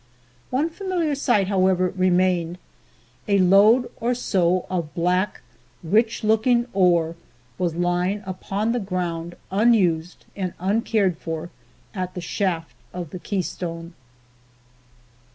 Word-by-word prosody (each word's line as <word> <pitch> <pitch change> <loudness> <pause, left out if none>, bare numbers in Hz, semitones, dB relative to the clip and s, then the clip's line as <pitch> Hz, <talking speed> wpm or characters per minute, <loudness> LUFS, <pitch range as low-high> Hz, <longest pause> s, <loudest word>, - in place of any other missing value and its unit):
One 295 +6 0
familiar 350 -4 -1
sight, 240 -8 +2
however, 185 -2 +2
remained. 180 -2 +2 0.7
A 200 -1 +3
load 200 +6 +5
or 245 +2 0
so 185 -6 +1
of 170 -5 -3
black, 180 +3 0 0.4
rich 220 +7 +1
looking 225 +3 +3
ore 170 -4 +3 0.4
was 175 -3 0
lying 175 +3 0
upon 195 +4 -2
the 245 - 0
ground 175 -4 -3 0.2
unused 185 -6 +2
and 185 -3 -3
uncared 200 -1 +1
for 165 +1 -5 0.4
at 185 -2 -4
the - - -4
shaft 170 -2 -2 0.2
of 175 -4 -6
the 180 - -6
Keystone. 170 -3 -4
185 Hz, 115 wpm, -23 LUFS, 175-215 Hz, 0.7 s, load